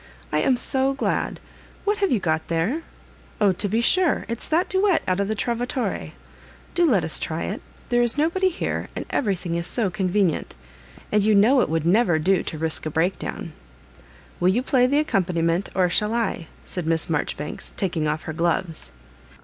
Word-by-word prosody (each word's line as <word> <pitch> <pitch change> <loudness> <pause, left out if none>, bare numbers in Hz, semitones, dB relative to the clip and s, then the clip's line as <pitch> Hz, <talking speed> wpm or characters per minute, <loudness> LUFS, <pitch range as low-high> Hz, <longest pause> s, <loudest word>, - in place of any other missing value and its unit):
I 150 - +2
am 250 +10 +3
so 265 +2 0
glad. 280 - -1 0.5
What 415 0 +1
have 395 -1 +1
you 240 - +3
got 160 -3 -1
there? 175 - 0 0.6
Oh, 205 -2 +4
to 195 +3 -2
be 220 +4 +1
sure, 360 +7 +2
if 230 0 -3
s - - -9
thai 325 +3 +3
duet 380 -1 +2
out 185 +1 +1
of 200 - +1
the 220 - -1
Trovatore. 245 +3 -2 0.6
Do 345 -2 +3
let 195 - +3
us 160 - -1
try 160 +1 -3
it; 205 - -4 0.3
there 240 0 +3
id 240 +2 +2
nobody 345 +5 +2
here, 350 - -3
and - - -4
every 205 -8 +1
thing 175 -1 -5
is 170 0 -1
so 215 -4 0
convenient 190 -3 0 0.3
— - - -22
and 210 - +3
you 215 +1 +3
know 240 +7 +5
it - - 0
would 160 0 0
never 180 -2 +4
do 185 +4 +2
to 155 - -6
risk 160 0 -1
a - - -1
breakdown. 165 +5 -2 0.9
Will 180 - +3
you 235 +7 +1
play 255 -1 +3
the 280 +3 +2
accompaniment, 180 - +1
or 185 -1 +3
shall 210 +5 +1
I?" 225 -8 -1 0.2
said 175 -3 -1
Miss 165 0 +2
Mar 150 -3 +1
joribanks, 150 +1 -5
taking 165 -5 -1
off 155 +1 -2
her 160 - -5
gloves. 165 - -1
195 Hz, 200 wpm, -23 LUFS, 165-245 Hz, 0.9 s, know